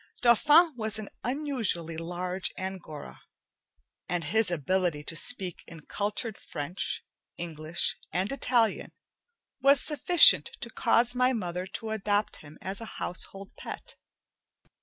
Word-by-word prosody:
Dauphin 300 +8 +5
was 220 -2 -2
an 215 -2 -7
unusually 240 - -1
large 180 +3 -3
Angora, 185 -6 -7 0.9
and 175 -1 -1
his 220 +6 +1
ability 175 -1 -1
to 160 - -4
speak 185 0 0
in 165 -2 -11
cultured 210 +6 -3
French, 150 +6 -4 0.3
English, 165 -1 0
and 185 +3 -1
Italian 245 -4 0 0.7
was 275 0 +5
sufficient 315 +5 +7
to - - -5
cause 240 +1 +2
my 250 +1 +2
mother 180 -4 -4
to 220 +3 -6
adopt 205 -1 -1
him 155 0 -14
as 195 +3 -4
a - - -5
household 195 +2 -6
pet. - - -9
195 Hz, 120 wpm, -28 LUFS, 175-240 Hz, 0.9 s, sufficient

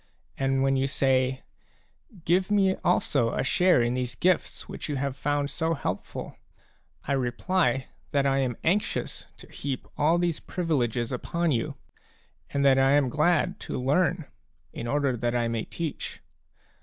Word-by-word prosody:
And 135 0 +1
when 135 0 +2
you 135 +1 +1
say: 130 -1 +1 0.4
" 190 - -23
Give 185 +3 +2
me 195 -2 +3
also 120 -5 +2
a - - 0
share 180 -8 +4
in 120 +1 0
these 125 -1 -2
gifts 180 -1 0
which - - -6
you 145 - -1
have 135 0 -2
found 145 0 -1
so 165 +1 0
helpful/' - - -5 0.7
I - - -1
reply 135 +3 +1 0.2
that 140 -1 +1
I 135 0 +2
am 125 -3 -1
anxious 195 +6 -1
to - - -14
heap 135 -2 -4
all 155 +3 +4
these 175 -3 0
privileges 125 - -1
upon 170 +6 -1
you, 115 -4 -1 0.7
and 140 0 0
that 135 -1 +6
I 135 +1 +4
am 145 -3 +3
glad 175 +6 +1
to - - -4
learn 165 +5 +1 0.5
in 115 - -5
order 140 -1 +1
that 120 +1 -1
I 120 -1 +1
may 115 -1 -2
teach. 165 -4 -5
140 Hz, 160 wpm, -27 LUFS, 130-165 Hz, 0.7 s, that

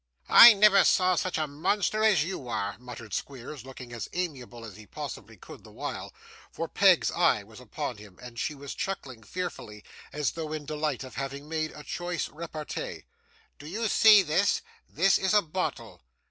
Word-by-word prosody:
'I 235 -2 +10
never 200 -1 +6
saw 185 0 +3
such 180 0 -1
a 155 - 0
monster 200 +9 -1
as 205 -9 +4
you 165 -7 -6
are!' 100 -4 -3
muttered 120 -4 -10
Squeers, 135 0 -6
looking 130 -2 -10
as 115 -4 -6
amiable 130 -10 -5
as 105 -4 -10
he 110 0 -14
possibly - - -8
could - - -13
the - - -15
while; - - -6 0.4
for - - -5
Peg's - - +4
eye 105 - +2
was 110 +2 -15
upon 125 -1 -5
him, 105 -3 -14
and 120 -2 -10
she 150 - -2
was 140 0 -8
chuckling 135 -12 -5
fearfully, 110 - -6 0.3
as 145 -4 -1
though 155 -2 -5
in 155 -2 -5
delight 150 -1 -2
at 130 - -10
having 135 +3 -6
made 155 0 -2
a 150 - -11
choice 175 0 -4
repartee, 165 - -6 0.6
'Do 150 - -10
you 220 +7 -2
see 210 -1 +7
this? 185 +5 +1 0.3
This 195 +5 +3
is 190 +2 +1
a 210 - +6
bottle. 180 +4 -4
150 Hz, 180 wpm, -28 LUFS, 125-185 Hz, 0.6 s, I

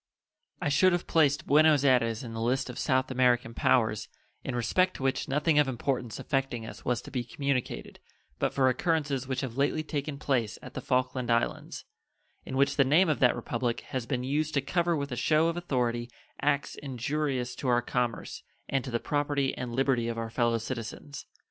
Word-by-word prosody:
I - - -1
should 185 +6 +4
have 175 - -1
placed 150 -3 +2
Buenos 150 -1 +5
Ayres 120 -3 +3
in 115 -2 -7
the 115 - -4
list 125 +2 0
of 125 - -8
South 130 0 +1
American 125 -2 +2
powers 110 -4 +2 0.4
in 130 - -3
respect 185 +10 +1
to - - -7
which 135 -1 0
nothing 150 +2 +2
of 145 - +4
importance 125 -2 -2
affecting 135 -5 -2
us - - -10
was 125 0 -1
to - - -10
be 125 -3 -2
communicated 140 0 -3 0.4
but - - +1
for 130 -1 +2
occurrences 140 -1 0
which 130 -1 -2
have 130 -3 -5
lately 145 +2 +1
taken 150 -2 -4
place 125 -7 -1
at 125 - -10
the 130 - -5
Falkland 125 -1 0
Islands, 115 0 -1 0.6
in 130 - -5
which 140 +1 +2
the 140 - +6
name 160 +7 +4
of 150 - +1
that 125 -2 +4
Republic 120 -1 -2
has 130 -3 -3
been 125 -2 -1
used 150 +3 -1
to 140 - +3
cover 170 +4 +1
with 140 -1 -4
a - - -2
show 155 +5 +3
of 165 - -3
authority 125 -8 -1 0.3
acts 145 -1 +1
injurious 135 -1 -2
to 135 - -4
our 120 -1 +3
commerce 120 -2 -2 0.3
and 135 -2 0
to - - -6
the 120 -1 -1
property 145 -1 0
and 120 -1 -5
liberty 130 -3 +1
of 115 0 -3
our 115 -1 -4
fellow 120 -1 +2
citizens. 125 +4 -6
130 Hz, 195 wpm, -29 LUFS, 120-145 Hz, 0.6 s, the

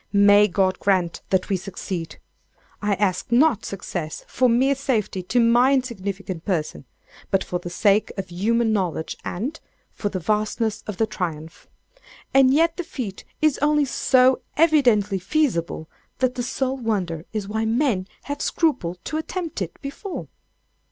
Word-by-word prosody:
May 205 +1 +6
God 185 -1 +1
grant 185 -4 +1
that 190 -1 +1
we 195 - +1
succeed! 180 -2 -6 0.6
I 205 -1 +1
ask 190 +1 -1
not 245 -2 +4
success 175 -5 -5
for 255 0 +2
mere 260 +4 +3
safety 240 -8 -1
to 230 +7 0
my 240 +3 +5
insignificant 200 -8 -3
person, 155 - -2 0.4
but 195 -1 +2
for 180 - -3
the 175 - -7
sake 205 +3 +2
of 195 -2 -5
human 220 +5 +1
knowledge 180 -6 -1
and—for 225 - -5
the 195 - -3
vastness 215 +3 -1
of 210 -3 -5
the 225 - +2
triumph. 165 -6 -5 0.7
And 270 -1 +6
yet 330 +4 +3
the 355 - -2
feat 250 - -6 0.2
is 310 -3 +3
only 295 0 +3
so 260 -1 +3 0.2
evidently 245 - +4
feasible 185 - 0 0.3
that 255 -1 +1
the 250 - -3
sole 265 +2 -1
wonder 185 -9 -2
is 210 -3 -3
why 220 +2 -1
men 225 -5 +1 0.2
have 285 0 -5
scrupled 250 - 0
to 310 - -2
attempt 325 - -4
it 170 -3 -5
before. 315 +7 -6
215 Hz, 150 wpm, -23 LUFS, 185-260 Hz, 0.7 s, May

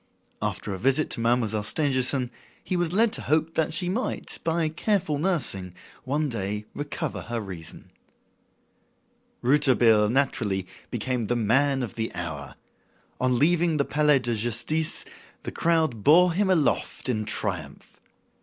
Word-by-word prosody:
After 105 - -3
a 95 - -5
visit 135 +7 +2
to - - -2
Mademoiselle 115 -2 +1
Stangerson, 130 +1 +1 0.3
he 185 - -2
was 175 -2 0
led 220 +4 +3
to - - -2
hope 160 +1 +1
that 160 +1 0
she 175 +2 -1
might, 215 +8 -3
by 165 0 +1
careful 160 -1 0
nursing, 130 - -1 0.3
one 145 +3 0
day 105 -3 -3
recover 145 0 -4
her 120 -1 -4
reason. 95 -6 -8 1.5
Rouletabille, 120 -5 +4
naturally, 110 -7 0 0.2
became 120 -1 -2
the 120 - 0
"man 135 +4 +2
of 115 - -5
the 115 0 -3
hour." 80 -5 -5 0.6
On 125 -1 +2
leaving 165 +3 +3
the 140 - +1
Palais 150 -1 +3
de 120 -2 -1
Justice, 120 +8 -1 0.4
the - - -5
crowd 160 -10 +1
bore 175 +4 +6
him 195 +2 +1
aloft 165 -6 +1
in 110 -4 0
triumph. 90 -9 -4
130 Hz, 140 wpm, -26 LUFS, 110-160 Hz, 1.5 s, bore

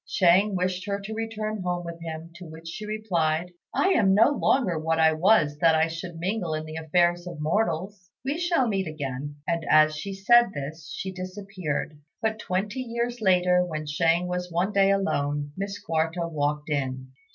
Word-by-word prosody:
Shang 190 +3 +4
wished 185 +2 -1
her 200 0 -1
to 200 +2 -6
return 215 -1 -3
home 175 -1 -2
with 170 0 -7
him; 165 0 -7
to 180 - -10
which 160 +1 -11
she 210 +6 -6
replied, 180 -6 -1 0.2
"I 380 - +2
am 195 - +4
no 225 +6 +6
longer 225 - +1
what 160 +1 0
I 160 0 +5
was 155 -4 +3
that 165 0 +5
I 160 +1 +2
should 165 +1 -6
mingle 180 -2 -2
in 155 0 -4
the 155 - -8
affairs 175 +2 +1
of 170 -3 -7
mortals. 180 +2 -1 0.2
We 285 +5 -1
shall 345 -7 +2
meet 195 -4 -1
again." 145 -2 -5
And 170 -1 0
as 155 0 +5
she 195 +6 -5
said 235 +2 +5
this, 150 +3 -6
she 190 - -4
disappeared; 185 -5 -5 0.2
but 220 -1 -1
twenty 210 +7 -2
years 235 0 -3
later, 180 -2 +4
when 155 -3 -4
Shang 165 +3 +2
was 180 0 -3
one 175 +4 0
day 195 -1 +4
alone, 145 -7 0
Miss 200 +1 -4
Quarta 165 +1 -1
walked 150 -1 -2
in. 130 -2 -2
180 Hz, 185 wpm, -26 LUFS, 160-200 Hz, 0.2 s, no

